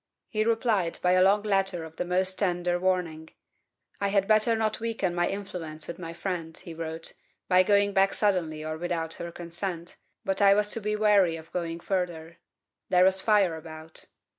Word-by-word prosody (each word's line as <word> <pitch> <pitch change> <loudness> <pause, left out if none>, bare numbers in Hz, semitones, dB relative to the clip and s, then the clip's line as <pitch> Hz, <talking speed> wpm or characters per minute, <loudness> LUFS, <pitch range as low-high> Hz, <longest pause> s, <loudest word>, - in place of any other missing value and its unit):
He 215 -1 0
replied 225 -6 +1
by 180 - +4
a 185 0 +5
long 200 +2 +4
letter 195 -4 0
of 160 0 -11
the - - -2
most 185 +1 0
tender 175 -2 0
warning. 175 -4 -1 0.7
I 200 - +1
had 195 -1 +1
better 215 +2 +4
not 220 -1 -1
weaken 225 -5 -1
my 175 0 +1
influence 175 -6 -5
with 170 - -7
my 165 -2 -6
friend, 170 -2 -4
he 170 - -8
wrote, 165 0 -4 0.3
by 185 0 +5
going 200 +1 +3
back 195 0 +3
suddenly 165 -7 0
or 155 0 -4
without 170 -2 -2
her 170 - -5
consent, 170 0 -6 0.3
but 195 +1 -1
I 200 0 +7
was 210 0 +1
to 225 - -3
be 210 +1 -1
very - - -5
wary 200 -6 +4
of 160 0 -11
going 170 -2 -3
further; 170 -3 -3 0.5
there 180 0 +5
was 190 0 +3
fire 200 -6 +3
about. 160 0 -7
180 Hz, 190 wpm, -27 LUFS, 165-200 Hz, 0.7 s, I